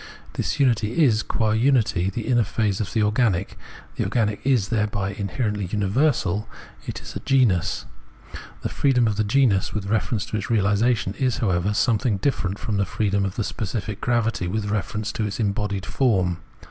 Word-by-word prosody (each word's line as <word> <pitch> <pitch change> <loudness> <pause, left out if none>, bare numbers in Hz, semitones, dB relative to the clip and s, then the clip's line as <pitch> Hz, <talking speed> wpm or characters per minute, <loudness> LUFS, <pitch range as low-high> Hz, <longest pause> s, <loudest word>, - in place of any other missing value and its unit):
This - - -2
unity 120 +2 +2
is 110 -6 +4
qua 110 -1 0
unity 110 -6 +2
the 115 +2 -4
inner 120 -2 +3
phase 105 -1 -1
of 95 - -3
the 110 -3 +1
organic; 105 -3 +1 0.4
the - - +1
organic 105 -4 0
is 125 -7 +2
thereby 105 -3 -1
inherently 105 0 -2
universal, 105 - 0 0.4
it - - -5
is - - -9
a - - -3
genus. 100 -9 +2 0.8
The - - -1
freedom 130 -4 +2
of 105 -2 -1
the 110 - +2
genus 110 -4 +2
with 105 -3 -2
reference 105 0 0
to 110 - -3
its 100 - -4
reaUsation 105 -1 +1
is, 130 -3 +1
however, 95 -5 +1
something 115 -2 +2
different 100 -4 -1
from 110 -2 -3
the 100 - +2
freedom 100 0 0
of 95 - -4
specific 105 0 -4
gravity 115 -6 0
with 100 +2 -2
reference 105 +1 -2
to 105 -1 -2
embodied 100 -2 -1
form. 95 -10 +1
105 Hz, 165 wpm, -23 LUFS, 100-120 Hz, 0.8 s, is